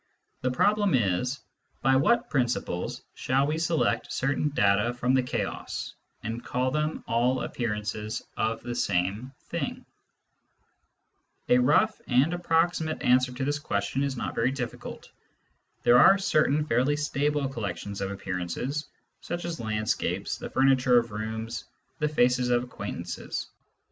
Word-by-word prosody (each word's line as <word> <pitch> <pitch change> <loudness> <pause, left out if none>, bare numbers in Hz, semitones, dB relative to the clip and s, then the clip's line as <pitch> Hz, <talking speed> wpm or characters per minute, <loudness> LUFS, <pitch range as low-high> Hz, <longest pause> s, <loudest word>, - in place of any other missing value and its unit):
The 130 - +1
problem 205 +7 +3
is: 120 +4 0 0.4
by 135 0 +4
what 235 - +3
principles 120 -9 -1
shall 135 +2 +1
we 155 +2 -1
select 165 -1 0
certain 140 +3 0
data 105 -2 +2
from 125 +1 +1
the 130 - +4
chaos, 125 - -4 0.3
and 115 +2 -4
call 130 +1 -1
them 150 +2 -1
all 125 +2 +1
appearances 110 -1 -3
of 110 0 -1
the 120 - -4
same 100 +4 -1
thing? - - -4 1.6
A 125 - +6
rough 150 - +3
and 135 +6 +3
approximate 165 -2 0
answer 125 +1 +4
to 130 +1 -3
this 145 +1 0
question 100 -1 -1
is 140 -2 -1
not - - -3
very 120 +3 +1
diflicult. 125 -3 -6 0.8
There 120 +1 +7
are 195 +10 +8
certain 155 -6 +2
fairly 130 +2 +2
stable 145 -1 0
collec 110 -9 -4
tions 100 -1 -6
of 95 - -1
appearances, 95 - -3 0.3
such 175 0 -5
as 170 -1 -4
landscapes, 110 -1 -1
the - - -6
furniture 130 -2 +4
of 115 -1 +1
rooms, 110 +2 -4 0.3
the 150 -1 +1
faces 125 -3 +2
of 120 0 +3
acquaintances. 125 - -5
125 Hz, 140 wpm, -27 LUFS, 115-145 Hz, 1.6 s, are